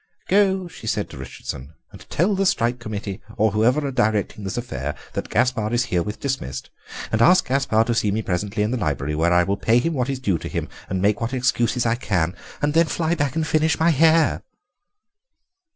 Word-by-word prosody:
"Go," 190 -2 +3
she 115 - -11
said 105 -1 -1
to - - -9
Richardson, 65 +2 -8 0.2
"and - - -14
tell 180 +6 +2
the 195 0 +1
Strike 120 -5 +1
Committee, 105 -3 -5 0.2
or 110 0 +3
whoever 125 +8 +2
are 140 - -2
directing 110 -4 0
this 95 +4 -4
affair, 75 - -4 0.2
that - - -4
Gaspare 115 -4 +1
is 120 +1 +1
herewith 90 +4 -1
dismissed. 135 - -4 0.4
And 110 - +1
ask 180 +9 +5
Gaspare 130 -4 +2
to 120 +1 -1
see 110 -2 +1
me 110 +2 -1
presently 100 +3 -1
in 105 - 0
the 130 - 0
library, 75 -5 -1
when 80 +3 +2
I 90 0 +5
will 100 +3 -1
pay 115 +3 +3
him 165 +7 +1
what 130 -2 -1
is 135 - -1
due 100 -10 0
to - - -6
him - - -3 0.2
and 95 0 -1
make 105 +2 +2
what 115 +3 -2
excuses 125 -1 +1
I 115 - +3
can; 90 -7 -1 0.3
and 145 0 +2
then 165 +1 +4
fly 165 0 0
back 145 -5 -1
and 160 -1 0
finish 155 +1 +1
my 165 +1 +4
hair." 160 +2 +4
115 Hz, 210 wpm, -22 LUFS, 100-145 Hz, 0.4 s, ask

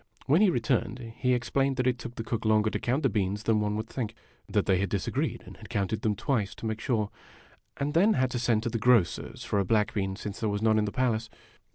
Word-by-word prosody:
When 155 +8 +4
he 210 - +6
returned, 120 - 0 0.2
he 125 -1 +2
explained 135 +2 0
that 125 - +1
it 125 -1 +1
took 120 0 -7
the 115 - -4
cook 115 0 -3
longer 110 -1 +3
to - - -2
count 130 +6 0
the - - +5
beans 100 -1 -1
than 110 -1 +2
one 105 0 0
would 110 +1 -2
think. 115 -2 -4 0.3
That - - +1
they 95 -2 +3
had 100 - 0
disagreed, 100 -3 -2
and - - -12
had - - -12
counted 100 +2 -1
them 110 -2 +1
twice, 105 -2 -1
to - - -8
make 110 0 -2
sure; 110 -5 0 0.7
and 145 +1 -1
then 195 +7 +5
had 130 -6 +1
to 120 - -2
send 115 -2 +1
to 120 - -1
the 115 0 -2
grocer's 115 -5 +2
for 105 - 0
a - - +3
black 105 +2 +1
bean, 95 -2 -1
since 105 0 -6
there 110 - 0
was 105 +1 -2
none 110 -1 +4
in 105 - +1
the 105 - -3
palace. 115 -2 0
110 Hz, 255 wpm, -28 LUFS, 105-125 Hz, 0.7 s, he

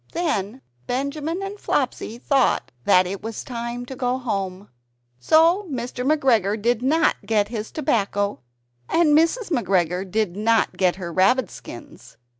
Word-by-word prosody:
Then 265 - -2 0.2
Benjamin 295 +7 -2
and 400 +1 -6
Flopsy 225 - -2
thought 270 +1 +1
that 185 0 +5
it 190 +2 -5
was 225 -1 -6
time 235 0 -5
to 265 - -8
go 250 0 -1
home. 200 -5 -4 0.5
So 330 - +4
Mr. 250 -2 -4
McGregor 245 -8 +2
did 235 +2 +1
not 310 +6 +2
get 210 -2 +1
his 220 -2 -5
tobacco, 205 - -1 0.5
and 320 -3 +4
Mrs. 340 +7 +2
McGregor 185 - 0
did 210 -2 -1
not 225 +2 +1
get 180 -2 +2
her 175 -3 -6
rabbit 200 +5 +3
skins. - - -12
235 Hz, 140 wpm, -23 LUFS, 200-290 Hz, 0.5 s, that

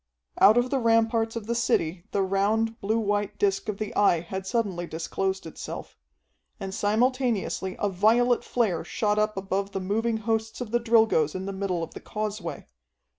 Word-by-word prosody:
Out 215 +4 +7
of 245 +1 +2
the 275 - +2
ramparts 225 -1 +2
of 230 -3 -4
the 235 - -1
city 180 -7 0
the 200 - 0
round, 215 +4 +1
blue 215 +3 +1
white 205 -1 -1
disc 195 +1 0
of 205 - -2
the 215 0 -5
Eye 175 -5 +4
had 190 +2 -6
suddenly 190 -6 -1
disclosed 190 +4 -3
itself. 160 - -7 0.6
And 190 -1 -5
simultaneously 220 -3 0
a 205 - 0
violet 225 +6 +3
flare 205 -10 0
shot 210 +4 0
up 215 -1 0
above 195 +1 -2
the 195 - -1
moving 220 +4 0
hosts 220 0 -2
of 245 -4 -5
the 240 - +2
Drilgoes 220 -10 +3
in 185 0 -4
the 195 - -4
middle 190 -3 -2
of - - -7
the - - -8
causeway. 210 -7 -4
210 Hz, 175 wpm, -26 LUFS, 190-225 Hz, 0.6 s, Out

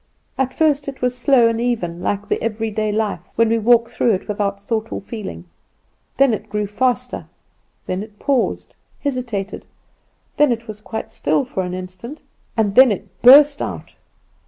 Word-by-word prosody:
"At 265 -1 0
first 295 -3 +2
it 270 -2 -7
was 250 0 +1
slow 250 -1 +4
and 230 0 -1
even, 180 -9 -2
like 205 +2 -2
the - - -1
everyday 215 -1 -2
life, 215 -1 -2
when 230 0 +3
we 230 0 +2
walk 235 +1 +4
through 235 -1 +1
it 185 - -7
without 200 -1 -2
thought 220 +2 -3
or - - -3
feeling; 195 - -7 0.7
then 275 -2 +4
it 215 - -5
grew 210 0 -1
faster, 250 +4 -1 0.6
then 185 +1 -3
it 210 -1 -11
paused, 270 0 -1 0.3
hesitated, 240 -8 -3 0.7
then 295 -3 +4
it 230 -1 -3
was 215 -1 -8
quite 220 +1 -6
still 275 - 0
for 220 -6 -3
an 180 0 -4
instant, 185 +10 -8 0.3
and 210 -3 +1
then 255 +1 +7
it 195 -2 -6
burst 285 +3 +8
out. - - -6
225 Hz, 170 wpm, -20 LUFS, 205-250 Hz, 0.7 s, burst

